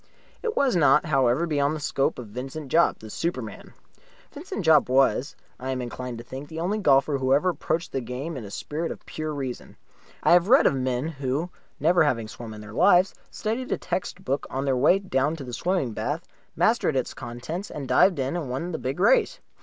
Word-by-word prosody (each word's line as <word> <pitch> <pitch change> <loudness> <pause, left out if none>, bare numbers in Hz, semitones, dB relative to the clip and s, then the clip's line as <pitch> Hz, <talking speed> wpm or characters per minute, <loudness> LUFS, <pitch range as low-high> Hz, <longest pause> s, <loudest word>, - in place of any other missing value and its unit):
It 455 -2 -3
was 275 -6 +3
not, 150 -2 +5
however, 135 0 +2
beyond 145 -2 +1
the - - -5
scope 140 -2 0
of 125 - -6
Vincent 135 +6 -6
Jopp, 170 +1 +4
the 110 - -11
superman. 170 +9 -4 0.6
Vincent 305 - -6
Jopp, 155 -5 +5
was, 130 0 +2 0.2
I 130 - -5
am 130 -1 -1
inclined 125 0 -5
to 115 - -8
think, 135 +4 -8
the 160 0 -6
only 195 +6 -1
golfer 140 -4 +3
who 130 +1 +3
ever 180 +6 +2
approached 170 0 -2
the 135 - -2
game 130 +7 -5
in 130 - -6
a 100 - -8
spirit 155 +10 -4
of - - -9
Pure 155 -1 -4
Reason. 130 -3 -6 0.5
I - - +4
have 175 +3 +5
read 265 +3 +6
of - - +5
men 130 +1 -1
who, 145 +2 -3 0.3
never 170 +3 +4
having 115 -7 0
swum 115 +1 -9
in 105 - -9
their 105 +1 -10
lives, 180 - +5 0.2
studied 230 +4 -3
a - - +1
text 180 +1 -4
book 135 +1 -1
on 135 +1 -3
their 135 -2 +2
way 140 +9 +5
down 155 -6 0
to 150 - -7
the 125 -2 -8
swimming 175 -3 0
bath, 145 +11 -3 0.3
mastered 220 -9 +2
its 130 - -1
contents, 155 - -6
and 140 -3 -6
dived 185 +4 +4
in 135 +4 -1
and 160 -7 -3
won 140 +8 -3
the 160 - -3
big 130 +5 -3
race. 470 - +3
145 Hz, 210 wpm, -25 LUFS, 130-170 Hz, 0.6 s, read